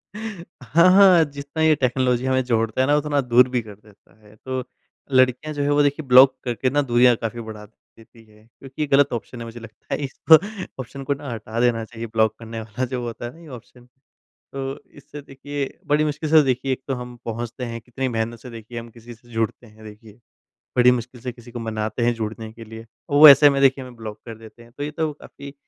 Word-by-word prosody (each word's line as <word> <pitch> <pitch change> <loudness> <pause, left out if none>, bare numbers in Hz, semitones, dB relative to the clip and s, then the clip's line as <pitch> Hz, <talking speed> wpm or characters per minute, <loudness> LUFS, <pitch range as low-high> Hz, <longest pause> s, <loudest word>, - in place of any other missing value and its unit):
हाँ, 175 - 0
हाँ। 185 -3 +7
जितना 140 +3 -6
ये 160 -1 +5
टेक्नोलॉजी 125 -1 0
हमें 130 0 +2
जोड़ता 115 0 0
है 130 - +2
ना 145 - +3
उतना 150 -1 0
दूर 125 0 +4
भी 125 -2 -1
कर 105 -2 -12
देता 105 +1 -24
है। 105 - -18
तो 130 +3 -5 0.5
लड़कियाँ 130 +4 +2
जो 145 - -3
है 140 - 0
वो 145 0 +3
देखिए 145 +1 -1
ब्लॉक 130 +1 +7
करके 125 +1 -1
ना 145 +2 +1
दूरियाँ 120 -2 +4
काफ़ी 115 +1 -5
बढ़ा 110 -2 -9
देती 115 +1 -22
हैं। 105 0 -22
क्योंकि 135 +5 -11
ये 150 - 0
गलत 140 0 +3
ऑप्शन 120 +1 -6
है 115 - -6
मुझे 115 +1 -9
लगता 115 -1 -10
है - - -2
इसको 140 +4 +5 0.5
ऑप्शन 135 +3 -9
को 140 - 0
ना 140 0 -8
हटा 110 0 -5
देना 120 -2 +1
चाहिए 115 0 -8
ब्लॉक 110 -1 +1
करने 115 0 -7
वाला 110 +4 -4
जो 125 0 -4
होता 120 0 -6
है 120 - -6
ना 165 - -17
ये 165 - -14
ऑप्शन। 125 -2 -13 0.7
तो 135 0 -4 0.2
इससे 150 - -11
देखिए, 140 0 -6
बड़ी 150 +1 +2
मुश्किल 150 +1 -3
से 160 -1 +7
देखिए 130 0 -1
एक 130 - -3
तो 135 - 0
हम 125 -1 -8
पहुँचते 120 +2 -5
हैं, 115 -1 -6
कितनी 125 +3 -5
मेहनत 115 0 -3
से 125 - -11
देखिए 115 0 -9
हम 115 0 -9
किसी 120 +1 -13
से 120 +2 -24
जुड़ते 115 +1 -3
हैं 110 0 -17
देखिए, 105 0 -13 0.7
बड़ी 125 0 +6
मुश्किल 125 0 -4
से 125 -1 -4
किसी 120 0 -15
को 120 - -6
मनाते 110 0 -3
हैं 120 - +2
जुड़ने 110 0 -6
के 115 +1 -12
लिए। 110 +1 -11 0.2
वो 145 +2 +9
ऐसे 145 +1 +8
में 140 0 0
देखिए 135 -1 +3
हमें 125 -1 -12
ब्लॉक 110 -2 -8
कर 115 -2 -9
देते 115 +1 -15
हैं। 115 - -19
तो 145 - -4
ये 150 - -4
तो 155 0 -2
काफ़ी 140 -1 -12
125 Hz, 230 wpm, -22 LUFS, 115-140 Hz, 0.7 s, वो